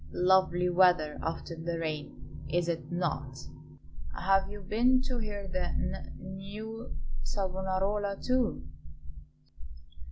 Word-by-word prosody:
Lovely 180 -1 +4
weather 175 -4 +4
after 165 +1 -3
the 165 +1 -3
rain, 155 -3 -5
is 175 0 +1
it 170 0 -2
not? 140 -6 -1 0.8
Have 195 +1 +3
you 205 0 -7
been 235 +6 +4
to 255 -2 -2
hear 205 -3 -4
the 185 -1 -1
n - - -3
new 195 - -7 0.2
Savonarola, 190 - -1
too?" 250 - +1
185 Hz, 105 wpm, -31 LUFS, 170-205 Hz, 0.8 s, Lovely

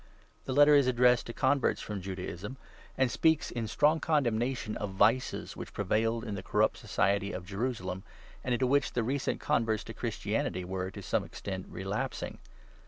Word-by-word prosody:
The 130 - -2
Letter 145 +2 +7
is 140 -3 +6
addressed 125 -1 +4
to - - -4
converts 130 +3 +2
from 105 -2 -5
Judaism, 95 +5 -6 0.4
and 130 -2 +2
speaks, 160 -2 +2
in 115 -2 -3
strong 150 +8 +3
condemnation, 120 -6 0
of 105 - -3
vices 115 +6 +2
which - - -8
prevailed 115 +3 +1
in 110 -4 -4
the 95 - -4
corrupt - - +1
society 100 0 +1
of 90 - -5
Jerusalem, 95 -2 -3 0.4
and 125 - -2
into 130 - +1
which 140 +3 +2
the 120 - +1
recent 135 +4 -1
converts 115 -7 +1
to - - -8
Christianity 90 0 -2
were, 95 0 -3
to 100 +1 -9
some - - 0
extent, 95 -2 -6
relapsing. 95 +3 -4
115 Hz, 170 wpm, -31 LUFS, 100-130 Hz, 0.4 s, Letter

